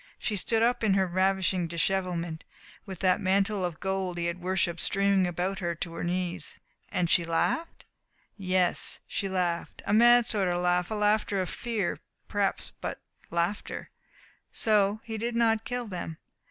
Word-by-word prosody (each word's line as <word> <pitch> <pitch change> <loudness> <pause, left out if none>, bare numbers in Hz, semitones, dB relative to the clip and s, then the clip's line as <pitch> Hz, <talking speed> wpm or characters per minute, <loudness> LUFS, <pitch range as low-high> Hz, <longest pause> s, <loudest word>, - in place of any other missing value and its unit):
She 220 - -2
stood 225 +4 +1
up 245 0 +2
in 200 -3 +3
her 190 -1 +3
ravishing 185 -1 +1
dishevelment, 170 -1 -1 0.4
with 190 -3 -7
that 185 -1 +3
mantle 195 +1 +1
of 175 -3 -3
gold 190 -2 -2
he 170 - -1
had 170 +1 -3
worshipped 175 -2 0
streaming 195 -2 +2
about 180 +3 -2
her 170 -2 -2
to 165 +1 -5
her - - -5
knees, 175 0 -2 0.3
and 180 - 0
she 170 - +4
laughed? 170 - -1 0.5
Yes, 185 -2 0
she 195 - -2
laughed 180 -2 -2
a - - 0
mad 240 +2 +7
sort 200 -4 +3
of 175 0 +1
laugh; 180 0 +1
a 220 - -2
laughter 210 -1 +2
of 185 -2 -2
fear, 225 -6 -2 0.3
perhaps - - 0
but - - -4 0.3
laughter. 170 +5 -2 0.6
So 210 -1 +2
he 225 -1 -5
did 235 +1 -2
not 225 -1 +2
kill 245 0 -3
them. 175 -5 -6
190 Hz, 165 wpm, -28 LUFS, 175-210 Hz, 0.6 s, mad